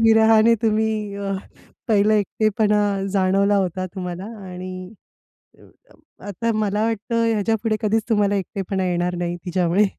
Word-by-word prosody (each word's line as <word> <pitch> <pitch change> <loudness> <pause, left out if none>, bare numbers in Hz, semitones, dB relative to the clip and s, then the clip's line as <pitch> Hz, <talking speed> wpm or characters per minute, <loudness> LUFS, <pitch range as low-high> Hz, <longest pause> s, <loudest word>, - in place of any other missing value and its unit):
विरहाने 225 0 +5
तुम्ही 215 -2 0
अ, 200 -1 -3 0.6
पहिलं 210 -1 +3
एकटेपणा 210 0 +1 0.3
जाणवला 195 +1 +2
होता 185 -1 -1
तुम्हाला 180 0 -5 0.3
आणि 185 +1 -7 0.9
अ, - - -18 0.6
आता 230 +4 -2
मला 210 0 0
वाटतं, 230 +1 -1
ह्याच्यापुढे 220 +1 0
कधीच 220 +1 +1
तुम्हाला 205 -2 +2
एकटेपणा 195 -1 -3
येणार 175 0 -1
नाही 175 0 -2
तिच्यामुळे. 180 +3 +2
205 Hz, 120 wpm, -22 LUFS, 185-220 Hz, 0.9 s, विरहाने